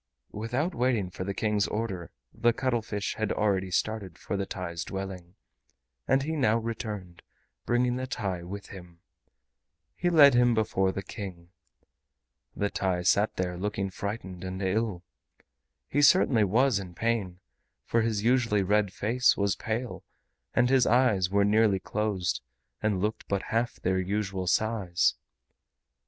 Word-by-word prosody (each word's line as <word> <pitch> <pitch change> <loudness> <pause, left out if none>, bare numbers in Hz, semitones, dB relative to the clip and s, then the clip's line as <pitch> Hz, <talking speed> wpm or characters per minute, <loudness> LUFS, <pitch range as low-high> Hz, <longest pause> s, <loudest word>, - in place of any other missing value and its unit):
Without 125 - -2
waiting 115 -7 0
for 95 - -5
the 100 +1 -3
King's 105 -2 +1
order 100 -6 -3 0.2
the 120 0 +2
cuttlefish 115 -5 -1
had 110 -1 -1
already 95 -3 +1
started 100 -1 -2
for - - -4
the 100 0 -2
TAI'S 85 -3 -4
dwelling, 95 -2 -6 0.7
and 135 0 +3
he 160 +3 -2
now 115 -7 +3
returned, 105 -6 -5 0.5
bringing 125 +1 +2
the 130 0 -3
TAI 95 -8 -3
with 100 +4 -8
him. 90 -3 -12 0.9
He 175 - 0
led 145 -5 +7
him 120 -1 +4
before 95 -3 +1
the 95 - -5
King. 90 -4 -8 1.1
The 100 0 -1
TAI 90 -2 -1
sat 100 +3 +3
there 90 -1 -2
looking 100 -1 -2
frightened 95 -2 -5
and 95 0 -5
ill. 95 -1 -1 0.8
He 145 - +1
certainly 135 - +5
was 115 +3 +3
in 90 -3 -9
pain, 105 -5 -1 0.5
for 115 - +2
his 110 -3 -1
usually 115 -4 +3
red 105 0 +2
face 115 +5 +2
was 100 -1 +1
pale, 115 +3 -4 0.5
and 120 - +4
his 130 -1 +4
eyes 110 -7 +3
were 100 +1 +3
nearly 105 -1 +4
closed 100 -3 -1 0.4
and 105 -3 +1
looked 105 +3 -2
but 100 -1 -1
half 115 +1 +1
their 95 +1 0
usual 95 -1 -2
size. 100 -3 +2
105 Hz, 145 wpm, -28 LUFS, 95-115 Hz, 1.1 s, led